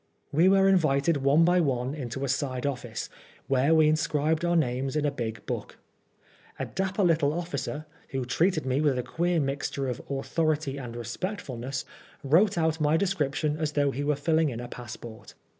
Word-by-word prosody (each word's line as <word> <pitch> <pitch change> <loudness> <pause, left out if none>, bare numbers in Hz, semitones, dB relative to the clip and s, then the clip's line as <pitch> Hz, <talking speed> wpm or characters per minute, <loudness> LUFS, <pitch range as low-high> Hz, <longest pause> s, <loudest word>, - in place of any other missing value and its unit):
We 165 +5 +5
were 195 0 +5
invited 160 -4 +3
one 140 +4 +4
by 180 +1 +4
one 130 -3 0
into 135 -2 -4
a - - -3
side 135 -1 -1
office, 125 -5 -3 0.4
where 135 +4 +3
we 155 -1 +5
inscribed 155 +1 +1
our 175 0 +2
names 135 -3 0
in 150 -1 +1
a 145 - +2
big 115 -5 -5
book. - - -5 0.8
A - - -2
dapper 195 +1 -1
little 160 -5 +3
officer, 155 -2 -4 0.2
who 130 -2 -3
treated 160 +5 +1
me 130 +2 +1
with 145 -4 +2
a 125 - -1
queer 170 +6 0
mixture 140 -1 -2
of 125 -1 -3
autho 140 +4 -1
rity 140 -2 -5
and 120 -1 -7
respectfulness, 130 - -4 0.4
wrote 180 +8 +4
out 160 -1 +1
my 150 +2 +3
description 155 -5 0
as 155 -2 -1
though 145 -1 +2
he 140 +2 -3
were 150 0 +1
filling 160 +2 +2
in 120 -3 -5
a 120 - -6
passport. 120 -2 -9
145 Hz, 180 wpm, -27 LUFS, 130-165 Hz, 0.8 s, We